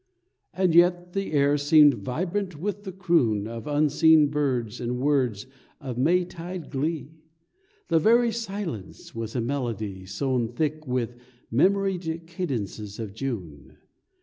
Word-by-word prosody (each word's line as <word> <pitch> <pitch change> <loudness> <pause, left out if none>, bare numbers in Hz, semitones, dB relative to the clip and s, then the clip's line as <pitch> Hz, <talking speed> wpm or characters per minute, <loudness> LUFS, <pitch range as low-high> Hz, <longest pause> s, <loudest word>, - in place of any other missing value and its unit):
And 185 -3 +2
yet 175 +1 +4
the 195 -3 -2
air 145 0 +3
seemed 145 0 +6
vibrant 170 - -3
with 205 +3 -4
the 190 - -4
croon 165 - +1
Of 115 +2 -7
unseen 150 +1 +4
birds 130 -6 -1
and 120 +1 -2
words 130 -7 +1 0.3
of 130 -5 -5
May 175 +6 +3
tide 175 -1 -8
glee; 155 +2 -3 0.7
The 165 -2 +3
very 235 +6 +4
silence 200 - -6
was 115 0 -5
a 120 - +1
melody 115 -7 -3
Sown 120 +4 -1
thick 155 +2 -2
with 120 -1 -2 0.3
memoried 180 +2 +1
cadences 115 - -4
of 110 -4 -6
June. 100 - -6
145 Hz, 130 wpm, -26 LUFS, 120-175 Hz, 0.7 s, seemed